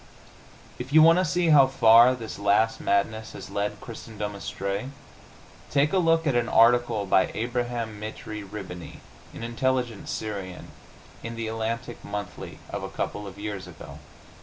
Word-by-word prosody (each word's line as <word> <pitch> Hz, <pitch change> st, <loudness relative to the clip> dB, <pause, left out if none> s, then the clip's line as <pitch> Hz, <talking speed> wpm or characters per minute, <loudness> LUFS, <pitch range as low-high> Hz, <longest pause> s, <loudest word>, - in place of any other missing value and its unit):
If 125 Hz, +2 st, -6 dB
you 155 Hz, +1 st, +7 dB
want 165 Hz, +2 st, +6 dB
to -, -, +3 dB
see 175 Hz, +1 st, +1 dB
how 140 Hz, -3 st, +7 dB
far 120 Hz, 0 st, +6 dB
this 115 Hz, -4 st, -8 dB
last 105 Hz, +2 st, +2 dB
madness 110 Hz, +2 st, 0 dB
has -, -, -9 dB
led 105 Hz, +1 st, -2 dB
Christendom 110 Hz, -3 st, -7 dB
astray, 100 Hz, +3 st, -4 dB, 0.8 s
take 145 Hz, +3 st, +2 dB
a 190 Hz, -, +4 dB
look 165 Hz, -1 st, +3 dB
at 145 Hz, -, +2 dB
an 120 Hz, 0 st, +1 dB
article 115 Hz, -2 st, +4 dB
by 95 Hz, 0 st, +3 dB
Abraham 120 Hz, -2 st, -3 dB
Mitrie 110 Hz, 0 st, -6 dB
Rihbany, 95 Hz, -4 st, -9 dB, 0.3 s
an -, -, -9 dB
intelligent 120 Hz, -1 st, -1 dB
Syrian, 100 Hz, -4 st, -5 dB, 0.5 s
in 115 Hz, 0 st, -6 dB
the 115 Hz, -1 st, -4 dB
Atlantic 115 Hz, +2 st, -4 dB
Monthly 100 Hz, -3 st, -6 dB
of -, -, -4 dB
a -, -, -5 dB
couple 105 Hz, 0 st, -4 dB
of 95 Hz, 0 st, -10 dB
years 100 Hz, -3 st, -5 dB
ago. 75 Hz, -4 st, -11 dB
110 Hz, 155 wpm, -26 LUFS, 100-125 Hz, 0.8 s, you